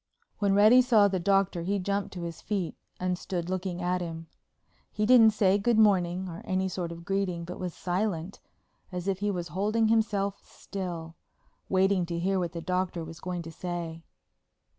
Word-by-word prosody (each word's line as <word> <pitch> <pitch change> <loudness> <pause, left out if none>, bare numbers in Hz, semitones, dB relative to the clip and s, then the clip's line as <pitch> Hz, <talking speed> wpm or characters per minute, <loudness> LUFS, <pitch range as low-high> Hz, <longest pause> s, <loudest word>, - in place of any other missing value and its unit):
When 200 -2 +2
Reddy 215 +5 +7
saw 225 -5 +5
the 190 -2 -1
Doctor 195 -1 +2
he 195 +4 0
jumped 200 +1 -2
to 175 - -5
his 170 -1 -6
feet 195 -5 -2 0.2
and 180 -1 -1
stood 180 -1 -4
looking 185 -1 -3
at 180 +1 0
him. 165 -1 -5 0.7
He 210 - 0
didn't 230 -1 +7
say 200 -2 +3
"Good 230 +2 +2
morning" 190 -4 +3
or 170 -1 -7
any 190 0 0
sort 175 -2 -4
of 170 0 -9
greeting, 190 -3 -1
but 180 - -7
was 180 -2 -4
silent, 185 -1 -2 0.5
as 180 0 -5
if 195 -1 0
he 205 +1 0
was 175 -4 -3
holding 215 +6 +1
himself 205 -3 +1
still, 175 -4 -6 0.6
waiting 190 -1 +2
to 170 0 -3
hear 190 +3 +1
what 175 -2 -2
the 170 - -5
Doctor 180 -1 -1
was 165 +1 -9
going 180 -1 -4
to 165 - -8
say. 170 -1 -5
185 Hz, 185 wpm, -28 LUFS, 175-200 Hz, 0.7 s, Reddy